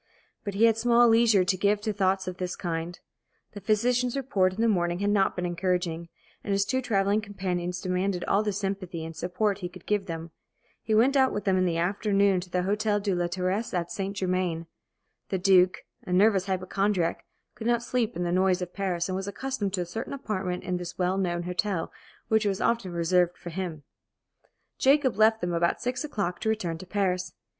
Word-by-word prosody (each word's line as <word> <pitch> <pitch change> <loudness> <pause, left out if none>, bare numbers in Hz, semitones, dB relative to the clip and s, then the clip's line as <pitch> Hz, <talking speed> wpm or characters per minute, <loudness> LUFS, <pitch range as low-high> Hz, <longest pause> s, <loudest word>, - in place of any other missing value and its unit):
But 200 -2 -4
he 210 - +2
had 225 -1 +4
small 240 +1 +5
leisure 225 -4 +5
to 190 +1 +2
give 205 +2 +2
to 215 0 -2
thoughts 190 -1 +1
of 185 -1 -4
this 180 -1 -3
kind. 170 0 -4 0.5
The 205 - -9
physician's 240 +5 +1
report 200 -9 +1
in 185 - -9
the 230 - +3
morning 175 -5 +1
had 200 +2 0
not 195 -2 +2
been 180 - -2
encouraging, 175 -1 -1 0.3
and 205 - -3
his 200 0 +2
two 260 +5 0
travelling 205 -3 +1
companions 180 -3 -3
demanded 185 0 -1
all 200 - +2
the 215 -1 -1
sympathy 190 -4 -4
and 165 0 -8
support 190 +5 -1
he 180 -2 -4
could 180 -1 -14
give 205 -2 0
them. 165 -1 -6 0.5
He 220 - 0
went 255 +6 +4
out 265 -1 +4
with 205 - -3
them 190 -2 +3
in 185 0 +2
the 170 -2 0
afternoon 200 +2 +2
to 180 0 -8
the 180 0 0
Hôtel 205 +1 0
de 200 -2 +1
la 175 -1 0
Terrasse 185 +4 -2
at 170 -1 -2
St. 195 0 -4
Germain. 185 -3 -1 0.6
The 190 - 0
Duke, 185 -1 +4 0.2
a - - -7
nervous 195 0 +4
hypochondriac, 190 -1 0 0.3
could 220 +1 -6
not 240 -1 +2
sleep 240 -2 -1
in 175 - -2
the 175 - -1
noise 185 0 +2
of 180 -1 -5
Paris, 180 -4 -1
and 185 - -2
was 195 +1 -3
accustomed 205 -2 -3
to 185 - 0
a - - -2
certain 220 +10 -5
apartment 190 -9 -3
in 180 -1 -2
this 175 -1 -7
well 185 +1 +1
known 175 -2 -1
hotel, 180 0 -2 0.4
which 220 -1 +2
was 195 -1 -1
often 230 -6 0
reserved 175 +1 +1
for 175 - -8
him. 170 -4 -5 1.0
Jacob 275 -1 +4
left 220 +1 +4
them 175 -1 -1
about 170 0 +1
six 250 +2 -2
o'clock 200 -11 -3
to 220 - -1
return 180 -7 -2
to 185 - -10
Paris. 185 -2 -1
190 Hz, 205 wpm, -27 LUFS, 180-210 Hz, 1.0 s, small